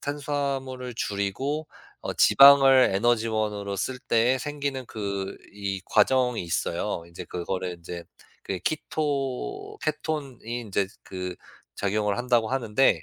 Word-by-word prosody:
탄수화물을 140 -3 -3
줄이고 130 +11 -2 0.3
어 - - -4
지방을 135 -3 +7
에너지원으로 110 -2 0
쓸 125 +6 -2
때에 120 +2 +2
생기는 140 -2 -3
그 100 -2 -4 0.2
이 100 -2 -4
과정이 125 0 +3
있어요. 85 0 -2
인제 85 +1 -9
그거를 90 +1 -3
인제 85 0 -8 0.4
그 95 -2 -3
키토 140 - -2
케톤이 150 -3 -2 0.2
인제 100 -2 0 0.2
그 90 -1 -6 0.4
작용을 105 0 0
한다고 120 -2 +2
하는데 115 -8 +2
115 Hz, 265 characters per minute, -26 LUFS, 100-135 Hz, 0.4 s, 지방을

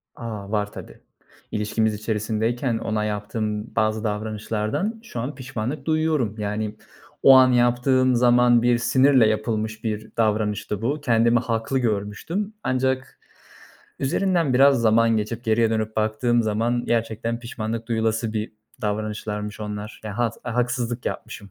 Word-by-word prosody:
A, 105 -4 -7
var 105 -1 -1
tabii. - - -11 0.5
İlişkimiz 110 +1 0
içerisindeyken 110 +3 -1
ona 110 -1 -2
yaptığım 105 +1 -3
bazı 110 0 +1
davranışlardan 110 - -2
şu 125 - -7
an 130 +6 -4
pişmanlık 130 +1 -5
duyuyorum. 155 -9 +1
Yani, 105 0 -3 0.5
o 135 - +9
an 130 -1 +7
yaptığım 125 +1 +3
zaman 120 0 +5
bir 120 0 +3
sinirle 130 0 +4
yapılmış 110 0 -2
bir 110 -1 -3
davranıştı 105 -2 0
bu. 145 +6 -1
Kendimi 115 -2 +3
haklı 115 +2 -1
görmüştüm 120 - -2
ancak 130 +1 -1 0.8
üzerinden 165 -1 +1
biraz 135 -1 +5
zaman 115 0 +4
geçip 115 +3 -3
geriye 115 0 +2
dönüp 110 -1 -2
baktığım 110 +2 +1
zaman 115 +3 0
gerçekten 115 0 -1
pişmanlık 115 -1 -5
duyulası 110 -1 0
bir 110 0 -3 0.3
davranışlarmış 105 0 -3
onlar. 105 0 -6
Ya 105 +2 -6
had 115 -2 +1
a 120 -2 -4
haksızlık 120 -1 -1
yapmışım. 100 -2 -6
115 Hz, 130 wpm, -23 LUFS, 110-125 Hz, 0.8 s, o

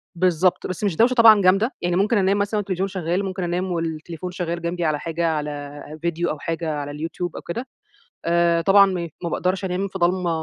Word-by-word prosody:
بالضبط، 180 +1 +2
بس 185 +3 -5
مش 195 -6 +1
دوشة 245 +6 +4
طبعًا 225 -4 +7
جامدة، 195 +7 +3
يعني 175 0 0
ممكن 210 +4 +2
أنام 195 +1 +2
مثلًا 205 +1 0
والتلفزيون 195 -1 -1
شغال، 185 0 -2
ممكن 185 -1 -4
أنام 180 +2 -2
والتليفون 165 +1 -4
شغال 170 -2 -3
جنبي 170 0 -2
على 150 -1 0
حاجة، 165 0 -2
على 145 -2 -4 0.2
فيديو 170 0 -1
أو 150 - -4
حاجة 165 0 -3
على 145 -1 -4
اليوتيوب 165 +3 -5
أو - - -6
كده. 240 +9 -5 0.6
آآ 170 0 +3
طبعًا 200 +3 +6
م 175 -3 -3
ما 170 - -1
باقدرش 185 +4 -1
أنام 190 +2 -1
في 190 0 -7
ضلمة 175 0 +1
175 Hz, 200 wpm, -22 LUFS, 165-190 Hz, 0.6 s, طبعًا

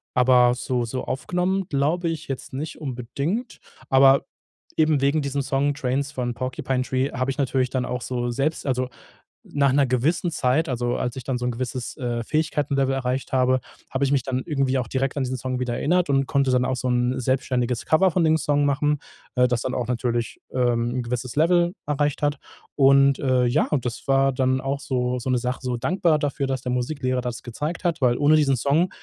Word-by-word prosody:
aber 125 -1 +5
so 125 -1 -1
so 125 +2 -4
aufgenommen, 180 +7 -1
glaube 155 +5 0
ich, 165 0 -5
jetzt 135 -2 -5
nicht 150 +4 -5
unbedingt. 140 - -3 0.3
Aber 135 +1 +6 0.5
eben 155 -3 +3
wegen 140 +3 +2
diesem 140 0 -2
Song 140 +1 +1
"trains" 140 +1 -1
von 125 -3 -3
Porcupine 130 +1 -2
Tree 130 +2 -1
hab 130 +2 -2
ich 135 - -2
natürlich 130 -2 +1
dann 130 -1 -1
auch 125 0 -3
so 120 -1 -2
selbst 140 +6 -1
also, 130 -2 -1 0.5
nach 140 -2 +1
'ner 140 +1 +3
gewissen 155 +8 +1
Zeit, 145 +3 +1
also, 120 -2 -1
als 125 - -2
ich 130 - -6
dann 130 +1 -2
so 125 - -3
'n 125 - 0
gewisses, 125 +1 -4
äh, 120 -2 -2
Fähigkeitenlevel 145 -3 0
erreicht 130 0 -2
habe, 130 0 +2 0.3
hab 130 - -3
ich 140 - +1
mich 140 -2 +3
dann 130 0 -2
irgendwie 135 -4 0
auch 125 -2 -2
direkt 135 +1 -1
an 140 - 0
diesen 130 0 -2
Song 130 0 -3
wieder 125 -1 -1
erinnert 180 +1 +1
und 135 -1 +2
konnte 140 -3 +2
dann 125 0 +2
auch 130 - 0
so 125 0 -2
'n 125 +1 +1
selbstständiges 125 -2 0
Cover 185 +4 +4
von 170 0 +2
dem 160 0 +4
Song 145 -2 +1
machen, 145 +1 +1 0.4
äh, 125 0 +4
das 120 -1 0
dann 130 - -3
auch 120 -3 -2
natürlich, 120 -1 -2
ähm, 120 -2 +1
'n 125 - -1
gewisses 125 +2 -4
Level 175 +2 +3
erreicht 145 -1 0
hat. 145 0 +1 0.4
Und, 140 0 +5
äh, 130 -2 +2
ja, 120 +6 +1
das 120 +2 -5
war 135 0 +3
dann 130 0 +1
auch 140 +1 -2
so 125 -2 -1
so 130 - -4
'ne 125 - +2
Sache 125 +1 -2
so 125 -2 -2
dankbar 160 +4 +1
dafür, 145 -1 -1
dass 130 -2 -2
der 125 - -3
Musiklehrer 130 0 -1
das 120 -1 -5
gezeigt 150 +9 -5
hat, 170 -4 0
weil 120 -2 +3
ohne 145 +2 +4
diesen 140 -4 +3
Song 150 +9 +2
130 Hz, 205 wpm, -24 LUFS, 125-145 Hz, 0.5 s, Aber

